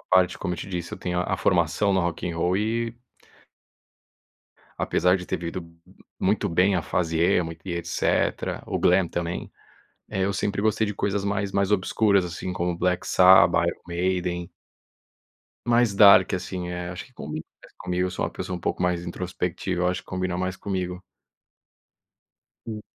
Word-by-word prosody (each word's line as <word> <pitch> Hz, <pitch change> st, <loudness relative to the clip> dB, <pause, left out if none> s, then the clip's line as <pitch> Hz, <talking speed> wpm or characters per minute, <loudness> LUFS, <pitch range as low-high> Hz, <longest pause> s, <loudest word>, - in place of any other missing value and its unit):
à -, -, -22 dB
parte, 90 Hz, -1 st, +4 dB
como 90 Hz, -, -2 dB
eu -, -, -10 dB
te -, -, -6 dB
disse, 90 Hz, -2 st, -5 dB
eu -, -, -5 dB
tenho 90 Hz, 0 st, -2 dB
a 90 Hz, -, 0 dB
a -, -, -4 dB
formação 100 Hz, -2 st, +2 dB
no 95 Hz, -, +3 dB
rock 85 Hz, -1 st, -2 dB
in 85 Hz, -, -2 dB
roll 90 Hz, +3 st, 0 dB
e 115 Hz, +2 st, -1 dB, 1.8 s
apesar 90 Hz, +2 st, +2 dB
de 90 Hz, -, -7 dB
ter -, -, -2 dB
vivido 85 Hz, +2 st, -4 dB
m 85 Hz, -1 st, -13 dB, 0.2 s
m -, -, -21 dB, 0.2 s
muito 105 Hz, +2 st, +1 dB
bem 90 Hz, +3 st, +3 dB
a 90 Hz, -, 0 dB
fase 80 Hz, 0 st, -1 dB
emo 85 Hz, 0 st, +2 dB
e 95 Hz, -, -4 dB
etc, 85 Hz, 0 st, -1 dB
o -, -, -2 dB
glam 90 Hz, 0 st, +3 dB
também. 85 Hz, 0 st, -4 dB, 0.6 s
Eh, 95 Hz, -, -2 dB
eu 100 Hz, -, -1 dB
sempre 100 Hz, +1 st, -1 dB
gostei 110 Hz, 0 st, +1 dB
de 105 Hz, -, -3 dB
coisas 100 Hz, 0 st, -1 dB
mais 100 Hz, 0 st, -1 dB
mais 100 Hz, 0 st, +1 dB
obscuras, 100 Hz, 0 st, +2 dB
assim, 90 Hz, +1 st, -5 dB
como 90 Hz, -1 st, -2 dB
Black 90 Hz, 0 st, 0 dB
Sabbath, 85 Hz, -2 st, +6 dB
Iron -, -, -3 dB
Maiden. 90 Hz, 0 st, -1 dB, 1.2 s
Mais 120 Hz, -2 st, +4 dB
dark, 100 Hz, -2 st, +7 dB
assim, 90 Hz, -1 st, -3 dB
eh, 90 Hz, 0 st, -4 dB
acho 90 Hz, +1 st, -7 dB
que 130 Hz, -, -24 dB
combina 75 Hz, -6 st, -6 dB, 0.2 s
mais -, -, -17 dB
comigo. 90 Hz, 0 st, -1 dB
Eu -, -, -3 dB
sou -, -, -2 dB
uma -, -, -3 dB
pessoa 90 Hz, -, -5 dB
pouco -, -, -2 dB
mais 90 Hz, -1 st, 0 dB
introspectiva, 90 Hz, 0 st, -3 dB
eu 90 Hz, -, +3 dB
acho 90 Hz, -, -1 dB
que -, -, -27 dB
combina 90 Hz, -1 st, -2 dB
mais 95 Hz, 0 st, -2 dB
comigo. 90 Hz, -2 st, -4 dB, 1.7 s
Sim. 110 Hz, -2 st, -5 dB
90 Hz, 185 wpm, -25 LUFS, 90-100 Hz, 1.8 s, dark